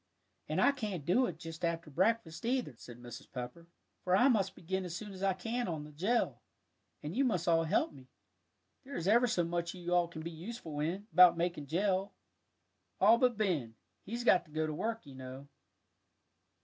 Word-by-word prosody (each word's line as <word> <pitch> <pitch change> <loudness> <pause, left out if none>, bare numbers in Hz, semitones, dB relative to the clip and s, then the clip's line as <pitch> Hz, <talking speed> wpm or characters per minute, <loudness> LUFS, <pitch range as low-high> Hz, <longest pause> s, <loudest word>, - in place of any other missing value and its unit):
"And - - 0
I - - +6
can't 210 - -4
do 245 +10 +3
it - - -6
just 165 0 -9
after 165 -2 -2
breakfast, 175 -1 0
either," 245 - 0
said 120 +1 -12
Mrs. 120 +2 -10
Pepper, 125 +6 -7 0.4
"for 180 0 +3
I 245 +8 +5
must 200 -6 +1
begin 190 +3 -3
as 175 -2 -5
soon 210 +1 -6
as 190 - -10
I 195 -1 +2
can 225 +6 -3
on 160 -4 -3
the 150 - -11
jell, 195 +11 0 0.6
and 150 +5 -5
you 270 - +3
must 185 -11 0
all 165 -1 +4
help 160 - +1
me. 130 -2 -14 0.8
There 275 +1 -8
is 170 - -2
ever 235 +4 +5
so 175 -6 +1
much 170 +1 -2
you 180 - -10
can 175 - 0
all 175 -1 +4
be 165 0 -7
useful 165 -2 -7
in, 175 +7 -2
about 180 -2 +8
making 170 -4 -2
jell. 190 +4 0 0.9
All 235 - +6
but 250 -3 +3
Ben, 160 - 0 0.3
he's 235 +4 -4
got 190 -6 +5
to 155 - -20
go 155 +1 0
to 155 - -3
work, 225 +5 -3
you 140 - -11
know." 130 +1 -9
175 Hz, 200 wpm, -33 LUFS, 155-210 Hz, 0.9 s, about